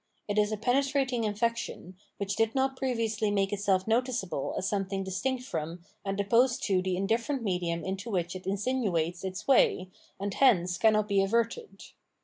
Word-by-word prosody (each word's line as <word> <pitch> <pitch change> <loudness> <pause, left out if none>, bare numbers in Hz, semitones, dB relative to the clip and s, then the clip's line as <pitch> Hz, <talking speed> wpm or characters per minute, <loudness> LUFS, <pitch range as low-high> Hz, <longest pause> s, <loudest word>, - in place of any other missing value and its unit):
It 205 0 +1
is 210 0 +2
a 215 - -1
penetrating 260 0 +1
infection, 215 -3 -2 0.2
which 200 -1 -2
did 225 +1 +1
not 265 0 +1
previously 230 -5 -1
make 200 -1 +1
itself 195 -2 +1
noticeable 225 - -1
as 190 - -1
something 195 -1 -1
distinct 245 +7 -2
from 165 -6 -5 0.2
and 195 0 -3
opposed 235 +5 +3
to 190 -3 +2
the 185 0 -1
indifierent 230 +7 -1
medium 175 -4 -1
into 190 +4 -4
which 180 -3 -1
it 185 - -8
insinuates 195 -5 -1
its 190 +1 -5
way, 185 -8 +3 0.3
and 200 0 -3
hence 180 -10 +3
cannot 215 -2 +4
be 200 -1 +3
averted. 230 - -1
205 Hz, 160 wpm, -29 LUFS, 190-235 Hz, 0.3 s, cannot